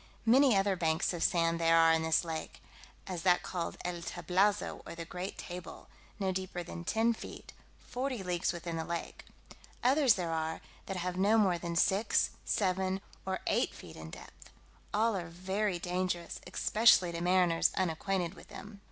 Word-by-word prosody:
Many 250 -1 +5
other 195 0 +2
banks 160 0 +1
of 170 - -4
sand 165 -1 +2
there 165 0 +5
are 165 0 +6
in 160 - +2
this 160 +1 +2
lake; 160 -1 -5 0.5
as 180 -3 -4
that 180 0 +3
called 175 -2 -4
El 175 -1 -3
Tablazo, 195 +4 0
or - - -8
the 165 0 -6
Great 180 +3 -6
Table, 180 -1 -8 0.3
no 190 -2 0
deeper 185 -1 -4
than 170 0 -7
ten 225 +5 +2
feet, - - -10 0.2
forty 250 -4 -4
leagues 180 -1 0
within 170 -1 -5
the 160 - -2
lake; 170 +1 -5 0.6
others 265 -1 +5
there 175 -3 -2
are, 160 0 -2 0.3
that 195 - -3
have 180 0 -3
no 205 +4 +4
more 190 -5 +3
than 170 0 -4
six, 195 +6 +2
seven, 190 -1 0 0.3
or 190 0 -2
eight - - +1
feet - - -11
in 80 0 -9
depth: - - -13 0.4
all 220 +1 +2
are 175 -3 -3
very 190 +3 -1
dangerous, 180 0 -3
especially 210 -4 +4
to 170 0 -4
mariners 180 -2 +3
unacquainted 185 0 -1
with - - -14
them. 205 0 -10
180 Hz, 170 wpm, -32 LUFS, 170-195 Hz, 0.6 s, are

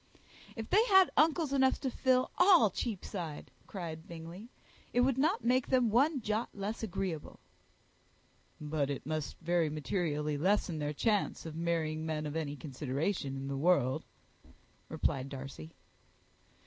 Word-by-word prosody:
"If 225 -1 -5
they 425 +3 +6
had 380 -5 +6
uncles 310 -1 +3
enough 265 -1 +3
to 265 -2 -1
fill 255 0 +2
all 355 - +6
Cheapside," 180 - -5 0.2
cried 165 -4 -6
Bingley, 170 +6 -9 0.4
"it 245 - +4
would 265 0 +2
not 320 +10 +2
make 255 +1 +3
them 250 -4 +3
one 275 +4 +3
jot 215 +2 -1
less 205 +3 -4
agreeable." 190 -6 -4 1.2
"But 150 -2 -1
it 140 - -4
must 155 0 -3
very 170 -1 +1
materially 150 0 -2
lessen 185 -2 +1
their 150 0 -1
chance 210 +4 0
of 160 -1 -6
marrying 160 -2 -1
men 155 -1 -2
of 150 +1 -4
any 150 -3 -2
consideration 140 +2 -3
in 135 0 -5
the 140 - -3
world," 140 -5 +2 0.9
replied 135 0 -1
Darcy. 135 - -8
170 Hz, 140 wpm, -32 LUFS, 150-235 Hz, 1.2 s, they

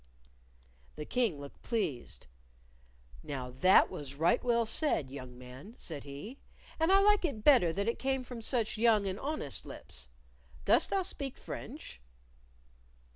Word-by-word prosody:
The 150 - -6
King 225 - 0
looked 140 0 -11
pleased. 185 - -3 1.0
"Now 130 -4 -5
that 185 +5 +6
was 145 -6 -6
right 170 +10 +2
well 235 -2 +2
said, 220 - 0
young 130 -3 -9
man," 130 - -11
said 150 -5 -4
he, 145 - -8 0.4
"and 325 +3 +3
I 390 - +7
like 415 0 +4
it 275 -11 -2
better 245 - +6
that 200 +5 -2
it 230 - -1
came 265 -1 0
from 245 -2 -8
such 225 -2 0
young 220 -3 +4
and 190 +1 -3
honest 285 - -3
lips. 60 -1 -8 0.6
Dost - - +4
thou 390 -1 +1
speak 280 -7 -4
French?" - - -8
210 Hz, 145 wpm, -32 LUFS, -, 1.0 s, I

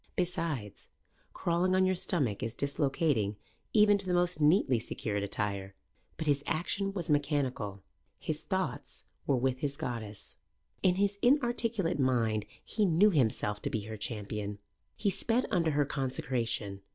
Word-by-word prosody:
Besides, 165 - -2 0.4
crawling 180 +2 +1
on 185 0 +4
your 185 - +3
stomach 145 - 0
is 115 +1 -3
dislocating 140 - +1 0.4
even 210 -2 +5
to 195 - -5
the 180 - +2
most 175 -2 +1
neatly 150 - +4
secured 105 -2 -3
attire. 100 -1 -3 0.4
But 160 - -3
his 145 -1 +2
action 195 +4 -1
was 180 -5 -4
mechanical. 135 -9 0 0.3
His - - -4
thoughts - - -3 0.2
were 135 - +3
with 130 +1 0
his 140 0 -2
goddess. 115 -8 -5 0.4
In 185 -2 +4
his 200 +1 +1
inarticulate 240 - +2
mind 115 -5 +1 0.2
he 215 - 0
knew 195 +3 +5
himself 110 - +1
to - - -2
be 110 - -1
her 110 +2 -6
champion. 105 -1 -4 0.4
He 200 - +1
sped 235 +6 +1
under 170 -5 +2
her 145 -1 +2
consecration. 120 -7 -2
145 Hz, 145 wpm, -31 LUFS, 110-180 Hz, 0.4 s, even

